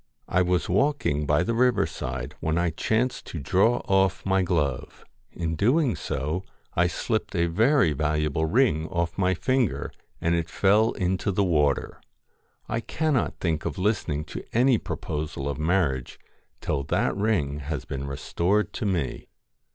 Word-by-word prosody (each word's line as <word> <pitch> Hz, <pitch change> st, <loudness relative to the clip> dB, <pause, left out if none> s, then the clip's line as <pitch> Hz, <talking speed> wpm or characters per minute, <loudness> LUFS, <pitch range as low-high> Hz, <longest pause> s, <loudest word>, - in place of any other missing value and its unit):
I 90 Hz, -, +2 dB
was 90 Hz, 0 st, +1 dB
walking 95 Hz, -, +1 dB
by 75 Hz, +4 st, +3 dB
the 115 Hz, -, -1 dB
river 125 Hz, 0 st, +3 dB
side, 60 Hz, -1 st, -5 dB
when 80 Hz, +1 st, -1 dB
I 85 Hz, -1 st, +1 dB
chanced 110 Hz, -, -1 dB
to 85 Hz, -, -5 dB
draw 95 Hz, -, +2 dB
off 95 Hz, -1 st, +2 dB
my 95 Hz, 0 st, +2 dB
glove. 75 Hz, -8 st, -2 dB, 0.3 s
In 85 Hz, -2 st, -3 dB
so -, -, -2 dB
doing 125 Hz, -, +2 dB, 0.8 s
I 90 Hz, +1 st, +4 dB
slipped 110 Hz, +4 st, -2 dB
a 85 Hz, -1 st, +2 dB
very 110 Hz, -, +3 dB
valuable 75 Hz, +1 st, 0 dB
ring 80 Hz, -, +2 dB
off 85 Hz, +1 st, -2 dB
my 95 Hz, 0 st, +2 dB
finger, 130 Hz, +1 st, 0 dB, 0.3 s
and 85 Hz, -, +1 dB
it 85 Hz, -1 st, -1 dB
fell 105 Hz, +3 st, +3 dB
into 95 Hz, +1 st, -1 dB
the 100 Hz, +2 st, +1 dB
water. 75 Hz, -6 st, +1 dB, 0.7 s
I 110 Hz, -, -1 dB
cannot 155 Hz, +2 st, -1 dB
think 80 Hz, -3 st, -1 dB
of -, -, -4 dB
listening 90 Hz, -7 st, 0 dB
to -, -, -5 dB
any 125 Hz, 0 st, +4 dB
proposal 80 Hz, -3 st, -4 dB
of 70 Hz, +1 st, -3 dB
marriage 75 Hz, -6 st, 0 dB, 0.4 s
till 70 Hz, -, -1 dB
that -, -, 0 dB
ring 90 Hz, -9 st, 0 dB
has 75 Hz, -1 st, -4 dB
been 70 Hz, +1 st, -5 dB
restored 90 Hz, +9 st, 0 dB
to 110 Hz, -, -2 dB
me.' 85 Hz, -8 st, -2 dB
90 Hz, 155 wpm, -26 LUFS, 75-105 Hz, 0.8 s, I